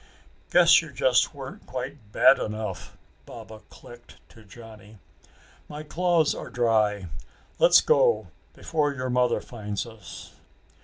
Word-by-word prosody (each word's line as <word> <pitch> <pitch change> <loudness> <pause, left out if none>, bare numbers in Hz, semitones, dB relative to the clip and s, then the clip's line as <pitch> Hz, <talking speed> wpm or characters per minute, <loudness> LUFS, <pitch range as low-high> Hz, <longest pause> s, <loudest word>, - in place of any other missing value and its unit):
"Guess 170 -2 +5
you 160 -3 -11
just 130 +2 +1
weren't 135 -1 -10
quite 130 -4 -8
bad 130 +5 +5
enough!" 105 -4 -6 0.3
Baba 110 -1 -11
clicked 120 0 -15
to 110 - -18
Johnny. 110 0 -15 0.7
"My 150 +1 -8
claws 170 0 +1
are - - -8
dry. 110 -5 0 0.5
Let's - - +6
go 475 0 +2 0.3
before 145 -3 -2
your 130 -1 -4
mother 125 -1 +1
finds 105 -4 -6
us." 110 -3 -12
125 Hz, 120 wpm, -25 LUFS, 110-150 Hz, 0.7 s, Let's